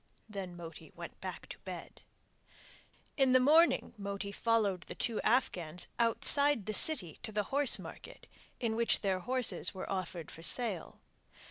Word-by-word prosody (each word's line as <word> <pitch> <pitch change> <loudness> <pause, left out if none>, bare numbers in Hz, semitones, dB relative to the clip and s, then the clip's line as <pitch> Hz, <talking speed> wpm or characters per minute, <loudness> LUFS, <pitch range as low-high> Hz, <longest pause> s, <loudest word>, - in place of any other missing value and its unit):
Then 195 -4 -7
Moti 165 -1 -10
went - - -10
back - - -7
to - - -9
bed! - - -9 1.2
In 265 -2 +4
the 255 - +7
morning 315 +6 +4
Moti 200 0 -4
followed 210 -4 0
the - - -7
two 230 -3 -2
Afghans 180 -8 0
outside 235 +1 +3
the 215 - -3
city 190 - +5
to - - -5
the 210 0 -1
horsemarket 280 -3 0 0.3
in 230 -3 -1
which 230 0 +1
they 195 -2 +1
horses 245 +3 0
were 185 - -6
offered 180 -4 -4
for 165 - -10
sale. 210 -1 -2
215 Hz, 145 wpm, -32 LUFS, 185-250 Hz, 1.2 s, the